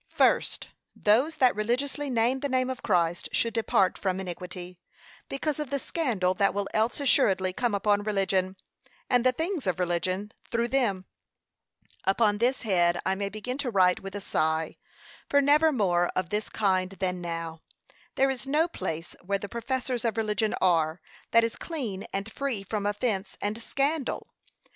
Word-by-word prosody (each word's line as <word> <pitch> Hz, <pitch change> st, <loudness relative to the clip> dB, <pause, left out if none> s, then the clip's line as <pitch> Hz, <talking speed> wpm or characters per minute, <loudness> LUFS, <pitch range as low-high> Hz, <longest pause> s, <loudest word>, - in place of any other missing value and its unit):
] -, -, -45 dB
First, -, -, +1 dB, 0.3 s
Those 250 Hz, +10 st, +3 dB
that 255 Hz, -3 st, +4 dB
religiously 265 Hz, +7 st, -1 dB
name 245 Hz, +2 st, +2 dB
the 285 Hz, -, -2 dB
name 255 Hz, 0 st, +1 dB
of 255 Hz, -, -6 dB
Christ 175 Hz, -4 st, +1 dB
should 230 Hz, +8 st, +1 dB
depart 215 Hz, -4 st, +2 dB
from 190 Hz, -1 st, -1 dB
iniquity, 180 Hz, -1 st, -7 dB, 0.5 s
because 290 Hz, +2 st, -2 dB
of 300 Hz, -3 st, -3 dB
the 280 Hz, -, 0 dB
scandal 235 Hz, -, 0 dB
that 200 Hz, +1 st, +1 dB
will 200 Hz, -1 st, -1 dB
else 220 Hz, +5 st, +1 dB
assuredly 195 Hz, -9 st, +3 dB
come 240 Hz, 0 st, 0 dB
upon 205 Hz, +1 st, +2 dB
religion, 195 Hz, -2 st, 0 dB, 0.6 s
and 245 Hz, -2 st, +4 dB
the 255 Hz, -, +5 dB
things 325 Hz, -, -2 dB
of 180 Hz, -1 st, 0 dB
religion, 185 Hz, +3 st, -1 dB, 0.2 s
through 235 Hz, 0 st, 0 dB
them. 215 Hz, -9 st, +1 dB, 1.0 s
Upon 205 Hz, +1 st, +2 dB
this 250 Hz, +3 st, +1 dB
head 175 Hz, -5 st, +2 dB
I 190 Hz, -, +2 dB
may 200 Hz, +1 st, -2 dB
begin 250 Hz, +6 st, -5 dB
to 275 Hz, -3 st, -1 dB
write 185 Hz, -4 st, +4 dB
with 195 Hz, +1 st, -8 dB
a 205 Hz, -, -4 dB
sigh, 160 Hz, -2 st, 0 dB, 0.5 s
for 285 Hz, -, +5 dB
never 295 Hz, +3 st, +5 dB
more 180 Hz, -9 st, +2 dB
of 185 Hz, -2 st, -1 dB
this 210 Hz, +1 st, -2 dB
kind 185 Hz, -3 st, +1 dB
than 185 Hz, -2 st, -2 dB
now! 165 Hz, -1 st, -5 dB, 0.5 s
There 270 Hz, 0 st, +3 dB
is 265 Hz, 0 st, -6 dB
no 305 Hz, +4 st, +3 dB
place, 165 Hz, -, -5 dB
where 200 Hz, +2 st, 0 dB
the 200 Hz, 0 st, -7 dB
professors 250 Hz, 0 st, -2 dB
of 230 Hz, -1 st, -1 dB
religion 215 Hz, 0 st, +1 dB
are, 165 Hz, -2 st, +2 dB, 0.3 s
that 230 Hz, 0 st, +5 dB
is 230 Hz, -, -1 dB
clean 240 Hz, -, -4 dB
and 195 Hz, +3 st, -3 dB
free 265 Hz, -8 st, -2 dB
from 205 Hz, +1 st, -2 dB
offence 205 Hz, -2 st, -1 dB
and 210 Hz, +3 st, -2 dB
scandal. 280 Hz, +3 st, -1 dB
210 Hz, 170 wpm, -27 LUFS, 185-255 Hz, 1.0 s, the